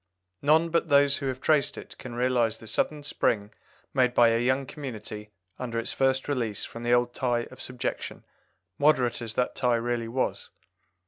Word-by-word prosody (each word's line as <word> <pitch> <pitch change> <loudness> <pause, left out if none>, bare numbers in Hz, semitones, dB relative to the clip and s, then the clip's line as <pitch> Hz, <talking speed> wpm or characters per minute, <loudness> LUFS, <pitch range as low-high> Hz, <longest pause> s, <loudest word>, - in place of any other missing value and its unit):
None 160 +3 +4
but 170 0 +1
those 140 -1 +5
who 140 - -3
have 130 -1 -3
traced 150 -3 +2
it - - -9
can 120 -2 -8
realize 120 -2 +1
the 115 - -13
sudden 150 +6 -1
spring 105 -7 0 0.4
made 125 -2 +2
by 120 -1 +6
a 115 0 +2
young 130 +3 +1
community 110 -6 -7 0.3
under 120 -2 -3
its 115 - -1
first 135 0 +1
release 120 -8 -1
from 115 - -9
the 120 0 -1
old 120 0 +3
tie 120 -2 0
of - - -11
subjection, 125 +1 -4 0.5
moderate 130 -5 +3
as 115 -2 -5
that 125 - 0
tie 125 -2 +2
really 120 0 -1
was. 125 +3 -2
125 Hz, 180 wpm, -27 LUFS, 115-135 Hz, 0.5 s, by